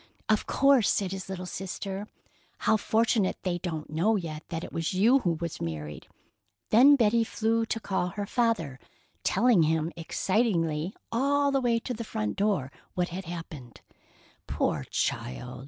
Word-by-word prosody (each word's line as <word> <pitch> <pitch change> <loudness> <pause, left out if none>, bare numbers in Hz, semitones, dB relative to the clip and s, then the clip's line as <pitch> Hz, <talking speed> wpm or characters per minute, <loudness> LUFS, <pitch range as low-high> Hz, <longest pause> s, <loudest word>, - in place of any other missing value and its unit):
"Of 215 -1 +1
course," 275 -5 +4
said 195 -3 0
his 190 0 -6
little 185 -1 -5
sister. 195 +2 -5 0.5
"How - - +2
fortunate 220 -1 +1
they 180 -2 -1
don't 160 -4 -5
know 180 +9 +2
yet 160 -6 -4
that 165 0 -4
it - - -8
was 165 +2 -2
you 230 +8 +5
who 175 -9 0
was 170 -2 -5
married." 75 -2 -5 0.6
Then 265 +6 +8
Betty 230 -2 +3
flew 225 0 0
to 225 - -2
call 190 -4 -1
her 200 +3 -4
father, 210 - 0 0.4
telling 240 -7 +4
him 160 +1 +1
excitedly 170 -2 0 0.2
all 280 +4 +2
the 270 -1 +1
way 240 -2 +2
to 250 - -4
the 230 0 -5
front 105 - -3
door 195 -10 0 0.2
what 180 0 0
had 185 +2 -6
happened. 155 - -8 0.7
"Poor - - -1
child! 125 - -3
190 Hz, 155 wpm, -28 LUFS, 165-225 Hz, 0.7 s, Then